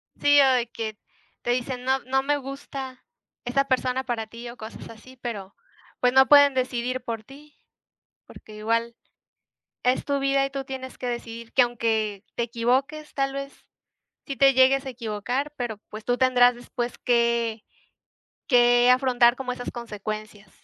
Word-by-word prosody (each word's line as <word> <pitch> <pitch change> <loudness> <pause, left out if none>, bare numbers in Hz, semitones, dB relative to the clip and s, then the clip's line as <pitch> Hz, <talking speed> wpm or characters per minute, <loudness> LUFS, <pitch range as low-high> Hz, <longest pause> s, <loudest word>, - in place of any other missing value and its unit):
Sí, 290 0 +5
o 270 -1 +5
de 245 -2 +1
que, 220 -2 -5 0.5
te 240 - 0
dicen 250 0 -2
"No, 265 0 +2
no 265 +1 0
me 290 +1 +1
gusta 270 -1 -8 0.4
esa 275 +3 +1
persona 260 -1 0
para 235 -4 -3
ti", 235 +2 -9
o 240 - -11
cosas 220 +1 -9
así, 255 +4 -14
pero, 200 -5 -6 0.4
pues, 250 0 +2
no 265 0 +6
pueden 285 -1 +7
decidir 255 0 -1
por 225 -2 -5
ti. 290 +4 -16 0.7
Porque 215 - -14
igual 230 +2 -1 0.9
es 250 +1 +1
tu 280 -1 0
vida, 275 0 +2
y - - -7
tú 275 0 -4
tienes 260 -1 -7
que 250 - -5
decidir 235 -1 -6
que 255 - +6
aunque 220 -4 -1
te 235 - 0
equivoques. 260 +6 -1
Tal 275 -1 0
vez 275 0 -7 0.6
sí 275 - -4
te 275 0 +5
llegues 265 +1 +4
a - - -4
equivocar, 245 +4 -3
pero, 240 -4 -3
pues, 215 0 -9
tú 245 0 +1
tendrás 250 -1 +5
después 240 0 -5
que, 235 -2 +1 0.9
que 245 -1 +5
afrontar 250 -1 +4
como 260 -2 -4
esas 245 0 -6
consecuencias, 215 -3 -7
245 Hz, 165 wpm, -25 LUFS, 235-265 Hz, 0.9 s, pueden